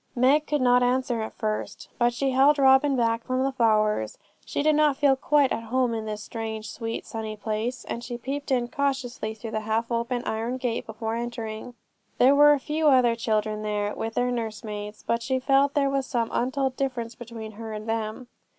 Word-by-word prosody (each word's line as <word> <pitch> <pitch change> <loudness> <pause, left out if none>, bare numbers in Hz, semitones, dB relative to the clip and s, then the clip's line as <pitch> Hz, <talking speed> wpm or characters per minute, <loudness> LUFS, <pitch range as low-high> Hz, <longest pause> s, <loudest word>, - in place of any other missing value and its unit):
Meg 275 +5 +3
could 295 -2 0
not 250 0 +5
answer 250 -1 +1
at 220 - -4
first, 215 -1 -4
but 240 0 +4
she 265 +3 -1
held 275 +3 +5
Robin 270 +1 +5
back 230 -2 +1
from 255 0 -1
the 270 - +1
flowers. 215 - +1 0.3
She - - -2
did 310 0 +4
not 300 -2 +3
feel 280 -2 +4
quite 285 0 +2
at 230 - -2
home 245 +1 +1
in 220 -1 -3
this 210 -1 -4
strange, 220 -2 -5
sweet, 225 -1 -5
sunny 220 -1 -5
place; 220 +4 -3
and 235 - -5
she 240 -1 -5
peeped 280 +4 -5
in 245 -3 +1
cautiously 260 -5 -2
through 220 +1 -7
the 215 - -1
half 220 +2 -2
open 235 +1 -1
iron 230 +3 -2
gate 245 -3 -2
before 220 0 -4
entering. 235 0 -5 0.4
There 260 +3 +6
were 295 +1 +7
a 290 - +1
few 305 +3 0
other 250 -4 +5
children 215 -2 -1
there, 210 -1 -1
with 225 0 -4
their 250 0 +1
nursemaids, 215 -2 -5
but 235 0 0
she 260 +2 0
felt 275 +2 +2
there 280 -1 +3
was 275 -1 -1
some 235 -3 -1
untold 260 +1 0
difference 250 -4 -3
between 230 -2 -8
her 220 +1 -8
and 215 +1 -6
them. 225 +2 -3
240 Hz, 200 wpm, -26 LUFS, 220-265 Hz, 0.4 s, were